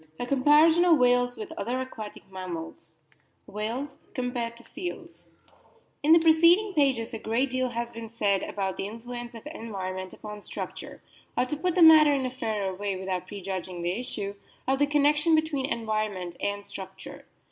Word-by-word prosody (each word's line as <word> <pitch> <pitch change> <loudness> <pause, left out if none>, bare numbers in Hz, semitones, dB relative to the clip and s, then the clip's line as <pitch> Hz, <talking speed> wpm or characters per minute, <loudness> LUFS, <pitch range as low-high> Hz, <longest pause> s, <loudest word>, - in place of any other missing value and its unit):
A - - -2
COMPARISON 295 +6 +5
OF 340 -3 +6
WHALES 245 -1 +3
WITH 390 -6 -6
OTHER 240 +6 -1
AQUATIC 220 -6 -8
MAMMALS 165 -3 -8 0.4
WHALES 230 +7 -5
COMPARED 245 -2 -3
TO 235 - -12
SEALS 345 +4 -8 0.7
IN 300 - +3
the 330 - +10
preceding 335 +5 +5
pages 265 -8 +1
a 225 - -4
great 240 +5 0
deal 255 0 0
has 235 0 -4
been 230 -1 -7
said 205 -4 +1
about 195 -2 -3
the 195 - -3
influence 240 +2 -7
of 230 - -10
environment 190 -9 -5
upon 210 -1 -9
structure, - - -7 0.3
or - - +3
to 255 - -3
put 340 +3 -1
the 360 - +6
matter 310 -2 +9
in 270 -2 0
a 255 - -2
fairer 215 -6 -2
way 200 +1 -3
without 185 -1 -3
pre 200 0 -7
judging 185 -2 -4
the 175 - +1
issue, 205 -5 -4 0.3
of 265 +1 +2
the 290 - +4
connection 295 +2 +3
between 310 -4 0
en 230 -4 -3
vironment 205 -5 -2
and 205 0 -2
structure. - - -9
240 Hz, 175 wpm, -27 LUFS, 205-290 Hz, 0.7 s, the